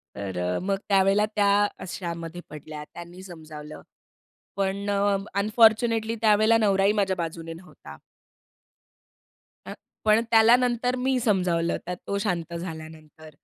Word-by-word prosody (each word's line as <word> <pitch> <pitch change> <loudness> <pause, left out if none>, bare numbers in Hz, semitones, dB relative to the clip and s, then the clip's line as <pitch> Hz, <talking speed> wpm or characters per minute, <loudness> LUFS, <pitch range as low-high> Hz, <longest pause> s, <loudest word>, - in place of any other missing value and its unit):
तर 100 -2 -5
अ, 90 0 -1
मग 195 +1 -1
त्यावेळेला 195 +1 +3
त्या 205 0 +3 0.2
अशामध्ये 170 -1 -6
पडल्या, 150 0 -9
त्यांनी 175 +2 -10
समजावलं, 155 -4 -10 0.8
पण 200 +1 -2
अ, 200 0 +2 0.2
अनफॉरच्युनेटली 225 +1 +3
त्यावेळेला 215 +1 +4
नवराही 200 -2 +3
माझ्या 195 -3 0
बाजूने 165 -1 -5
नव्हता. 165 - -13 1.7
अ, - - -7 0.3
पण 215 +1 +4
त्याला 225 +1 +7
नंतर 250 0 0
मी 255 0 0
समजावलं 180 -7 0
त्यात 180 0 -5
तो 200 - -1
शांत 175 -4 -3
झाल्यानंतर. 160 -2 -9
190 Hz, 120 wpm, -25 LUFS, 165-215 Hz, 1.7 s, त्याला